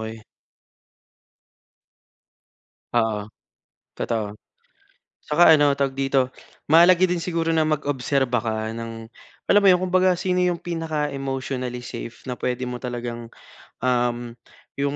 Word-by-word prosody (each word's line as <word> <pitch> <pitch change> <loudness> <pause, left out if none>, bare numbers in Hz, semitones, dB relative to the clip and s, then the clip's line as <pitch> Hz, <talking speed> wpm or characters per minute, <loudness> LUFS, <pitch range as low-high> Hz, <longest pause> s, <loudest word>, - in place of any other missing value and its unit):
okey. 110 0 -7 2.7
Oo. 110 -3 0 0.7
Totoo. 105 -2 -3 0.9
Saka 160 +3 +6
ano, 145 -1 +4
tawag 135 -1 -2
dito, 135 -1 +1 0.4
mahalaga 170 +3 +6
din 180 -1 +3
siguro 165 -1 -1
na 160 -1 +2
mag-obserba 140 -4 0
ka 110 -1 -2
ng, 115 0 -7 0.4
alam 205 - +7
mo - - +4
yung 185 -1 +5
kung 185 - -2
baga 185 0 +4
sino 180 +1 -1
yung 180 -1 0
pinaka-emotionally 135 -6 -3
safe 120 -1 -8
na 125 - -5
pwede 125 0 -2
mo 125 -1 -4
talagang, 120 -1 -5 0.5
um, 120 -1 0 0.4
yung 140 +1 -1
135 Hz, 115 wpm, -23 LUFS, 120-160 Hz, 2.7 s, alam